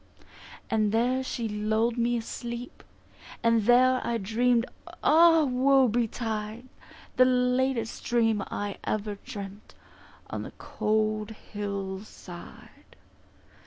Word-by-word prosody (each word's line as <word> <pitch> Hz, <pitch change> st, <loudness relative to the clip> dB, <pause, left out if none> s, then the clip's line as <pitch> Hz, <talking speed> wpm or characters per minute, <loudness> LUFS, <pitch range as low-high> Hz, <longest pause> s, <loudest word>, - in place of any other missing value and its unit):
And 215 Hz, -2 st, +1 dB
there 245 Hz, +4 st, +2 dB
she 235 Hz, -3 st, -3 dB
lulled 220 Hz, +2 st, 0 dB
me 240 Hz, 0 st, +1 dB
asleep, 235 Hz, +2 st, -6 dB, 0.6 s
And 230 Hz, -2 st, +3 dB
there 255 Hz, +2 st, +5 dB
I 235 Hz, -, -1 dB
dream'd, 230 Hz, +3 st, +1 dB, 0.4 s
Ah 325 Hz, 0 st, +6 dB
Woe 265 Hz, 0 st, +4 dB
betide, 225 Hz, 0 st, -2 dB, 0.5 s
The 255 Hz, -, +7 dB
latest 250 Hz, -2 st, +1 dB
dream 225 Hz, -3 st, +2 dB
I 205 Hz, -1 st, -4 dB
ever 210 Hz, -1 st, -3 dB
dreamt 205 Hz, -4 st, -9 dB, 0.6 s
On -, -, -3 dB
the -, -, -8 dB
cold 215 Hz, 0 st, -1 dB
hill 200 Hz, -3 st, -5 dB
side. 175 Hz, -4 st, -13 dB
230 Hz, 105 wpm, -27 LUFS, 215-250 Hz, 0.6 s, The